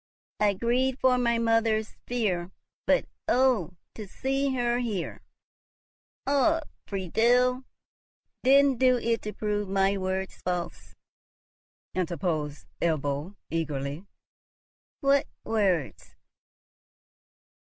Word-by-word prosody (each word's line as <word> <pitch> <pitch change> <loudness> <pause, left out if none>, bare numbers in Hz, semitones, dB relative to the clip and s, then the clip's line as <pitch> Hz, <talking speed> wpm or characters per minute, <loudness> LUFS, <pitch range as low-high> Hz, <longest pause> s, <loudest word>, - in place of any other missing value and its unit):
I 205 -1 +3
grieved 250 +5 +1
for 255 -1 +4
my 235 -1 +2
mother's 225 -1 +1
fear; 195 -8 -1 0.4
but - - +3 0.2
oh, 245 -9 +2 0.2
to 215 -2 -8
see 270 +5 -1
her 240 -1 +1
here!" 215 -8 -3 1.0
"Ah, 285 +4 +3 0.3
Friedel! 245 +7 +2 0.8
didst 275 -1 +5
do 255 -1 +5
it 230 -1 0
to 210 - -5
prove 210 -2 -2
my 195 0 +2
words 190 0 -3
false?" 180 -1 -4 1.0
interposed 160 -4 -2 0.2
Ebbo, 150 +2 -1 0.2
eagerly. 150 +1 -3 0.9
"What 275 -1 +3 0.2
words?" 190 - -1
215 Hz, 90 wpm, -27 LUFS, 180-250 Hz, 1.0 s, didst